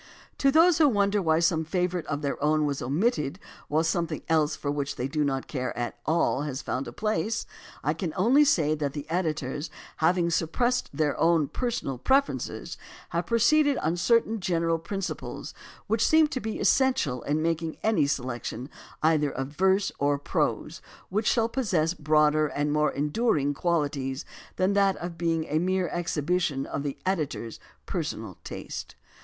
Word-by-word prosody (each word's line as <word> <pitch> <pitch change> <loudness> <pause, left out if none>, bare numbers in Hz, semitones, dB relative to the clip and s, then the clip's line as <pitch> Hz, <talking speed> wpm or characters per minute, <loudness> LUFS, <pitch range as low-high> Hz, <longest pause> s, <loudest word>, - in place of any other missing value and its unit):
To 275 - +4
those 330 +3 +5
who 305 - +6
wonder 205 -2 +2
why 160 -3 +3
some 165 -1 +2
favorite 180 0 -1
of 145 0 -3
their 140 0 -2
own 155 0 +3
was 140 -2 -2
omitted 150 - 0 0.3
while 155 +2 +1
something 165 -1 -1
else 155 -2 +2
for 145 - -3
which 145 -1 -2
they 125 - -2
do 150 +2 0
not 135 -2 -1
care 130 -5 -4
at 120 0 -3
all 160 -4 +2
has 145 -3 -4
found 135 - -3
a - - -6
place, 215 +1 -1 0.4
I 150 - +1
can 165 0 -3
only 245 +10 +5
say 160 - +3
that 145 -3 -2
the 145 -1 -5
editors, 155 -4 -2 0.3
having 170 +1 +2
suppressed 240 +10 0
their 145 0 0
own 165 -3 +3
personal 225 - -3
preferences, 275 - 0 0.3
have - - -2
proceeded 285 +5 +4
on 160 +2 0
certain 225 +4 +2
general 165 -3 0
prin 195 +4 -4
ciples 185 - -5 0.3
which 225 0 +1
seem 315 0 +5
to 260 - -3
be 220 0 -4
essential 250 - +2
in 150 +2 -1
making 165 -1 -1
any 220 -9 +3
selec 125 -4 -2
tion 125 +5 -5 0.3
either 155 -2 +3
of 135 0 -4
verse 190 +5 +2
or 145 0 +2
prose 140 - -2 0.3
which 210 +3 -1
shall 230 -2 +3
possess 185 -10 0
broader 155 -1 +3
and 145 +1 -1
more 150 0 +3
enduring 150 - +1
qualities 145 -5 -1 0.3
than 185 +2 +1
that 200 -1 +3
of 175 0 -6
being 165 -1 0
a 155 +1 0
mere 185 0 0
exhibition 165 -4 -1
of 140 - -4
the 140 -1 -4
editor's 150 - -2 0.3
personal - - -4
taste. - - -7
160 Hz, 170 wpm, -27 LUFS, 145-195 Hz, 0.4 s, who